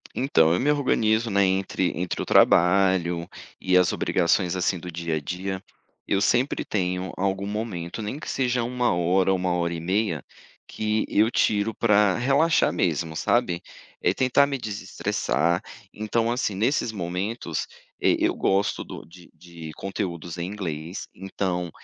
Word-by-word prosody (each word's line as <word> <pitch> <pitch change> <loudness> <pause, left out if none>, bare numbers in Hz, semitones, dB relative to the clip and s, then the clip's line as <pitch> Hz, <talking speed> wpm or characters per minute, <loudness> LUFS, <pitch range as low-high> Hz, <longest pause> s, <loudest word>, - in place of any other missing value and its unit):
Então, 85 - +3
eu 90 - +1
me 140 - +1
organizo, 115 -5 +1
né, 100 -1 +3
entre 95 -1 0
entre 90 0 -3
o - - -3
trabalho 90 -2 +4 0.3
e 90 -1 +3
as 90 -1 +3
obrigações, 90 +1 +1
assim, 90 0 0
do 90 +1 -7
dia 85 -1 -3
a - - -1
dia, 95 +5 -4 0.4
eu 100 - +2
sempre 120 +7 +1
tenho 90 -2 -2
algum 95 +1 -1
momento 105 -3 -4
nem 110 +7 -4
que - - -7
seja 125 -2 0
1 125 -1 0
hora, 90 +2 +2
1 90 -1 0
hora 85 -1 0
e 85 - -4
meia, 95 -1 -1 0.4
que 110 0 -1
eu 110 +2 +3
tiro 105 -1 +1
pra 105 -4 +3
relaxar 140 +6 +3
mesmo, 80 -2 -1
sabe. 85 +2 +1 0.4
É 90 - +2
tentar 130 +4 +3
me 140 -1 -2
desestressar, 90 - -1 0.3
então 115 +2 0
assim, 120 -5 -1
nesses 115 +3 +1
momentos, 90 -1 -3 0.3
e - - +3
eu - - +2
gosto 100 +1 +1
do - - -9
de 85 +1 -16
de 85 -2 -10
conteúdos 90 -3 -5
em 85 +1 -3
inglês, 90 -3 -5
então, 90 -2 -3
95 Hz, 155 wpm, -25 LUFS, 85-110 Hz, 0.4 s, trabalho